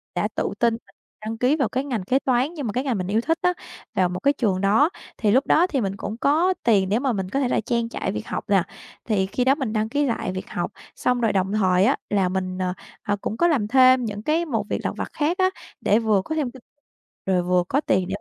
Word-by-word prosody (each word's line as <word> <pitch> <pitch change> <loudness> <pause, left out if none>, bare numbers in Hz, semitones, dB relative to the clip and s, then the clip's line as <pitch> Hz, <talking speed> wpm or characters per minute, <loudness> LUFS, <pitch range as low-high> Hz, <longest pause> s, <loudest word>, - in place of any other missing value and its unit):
Đã - - +1
tự - - -1
tin 235 -1 +3
và - - -21 0.3
đăng 225 +1 -4
ký 255 +5 +2
vào 270 -7 0
cái 260 +2 -1
ngành 235 -8 -2
kế 260 +8 +2
toán 260 +4 +1
như 300 -4 -5
mà 215 -5 -3
cái 255 - -1
ngành 255 -7 -1
mình 185 -1 -3
yêu 215 +3 +1
thích 325 +5 0
á, 360 - +2 0.4
vào 180 -1 +2
một 180 0 -4
cái 280 +1 +3
trường 200 -8 0
đó 215 +11 +4 0.3
thì 210 -3 +2
lúc 260 +4 +3
đó 345 +3 +4
thì 275 -8 -1
mình 195 -1 -2
cũng 215 +4 -5
có 320 +8 +3
tiền 200 -5 +3
để 215 +4 +2
mà 265 -2 0
mình 190 -3 -3
có 275 - -1
thể 265 - +1
là - - +1
trang 235 +1 -1
trải - - -3
việc - - -5
học - - -3
nè. - - +4 0.4
Thì 205 -4 +1
khi 245 +6 -1
đó 270 +2 +4
mình 260 -7 -3
đăng 215 0 0
ký 290 +4 +1
lại 230 -6 -2
việc 185 0 -6
học, 175 - -3 0.2
xong 250 -1 0
rồi 225 -3 +2
đồng 190 0 0
thời 185 -2 +3
á, 270 - +3
là 195 -3 +2
mình, 185 0 -3
ờ, 180 -1 -1 0.3
à, 205 - -1
cũng 220 - -3
có 345 - +4
làm 255 -11 +1
thêm 255 0 +5
những 210 0 -5
cái 325 +4 +1
một 225 -8 -2
việc - - 0
lặt - - -1
vặt - - -4
khác 320 +5 0
á, 375 0 +3 0.3
để 210 +3 +3
vừa 215 -4 +2
có 315 - -3
thêm 285 -6 -1
kinh 260 -1 -14 0.6
rồi 185 -2 +1
vừa 180 0 +2
có 280 +3 +2
tiền 185 -7 +1
230 Hz, 270 wpm, -23 LUFS, 195-275 Hz, 0.6 s, thêm